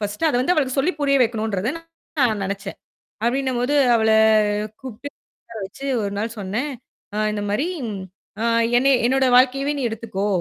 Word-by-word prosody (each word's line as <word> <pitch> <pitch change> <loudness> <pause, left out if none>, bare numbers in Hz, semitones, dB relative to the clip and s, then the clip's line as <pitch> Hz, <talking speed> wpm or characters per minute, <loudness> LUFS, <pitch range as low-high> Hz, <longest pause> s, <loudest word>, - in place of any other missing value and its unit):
First 205 +9 -1
அத 290 - -1
வந்து 270 +8 +2
அவளுக்கு 275 -5 0
சொல்லி 320 +7 +2
புரிய 280 -1 +3
வைக்கணுன்றது 220 -2 -1 0.5
நான் 220 -5 +2
நெனச்சேன். 200 +1 -4 0.5
அப்டின்னும்போது 255 +2 0 0.2
அவள 220 -1 +2 0.7
கூப்பிட்டு, 260 +2 -8 0.3
உக்கார 230 - -11
வச்சு 205 +8 -9 0.2
1 200 -1 -2
நாள் 225 +2 -3
சொன்னேன். 215 +9 -3 0.4
ஆ - - -2
இந்த 210 - -3
மாரி 270 +11 0 0.7
அ - - 0 0.3
என்ன 260 +3 +3 0.2
என்னோட 265 +2 +3
வாழ்க்கையவே 275 +3 +3
நீ 275 - -3
எடுத்துக்கோ! 215 -3 -3
240 Hz, 150 wpm, -22 LUFS, 210-270 Hz, 0.7 s, புரிய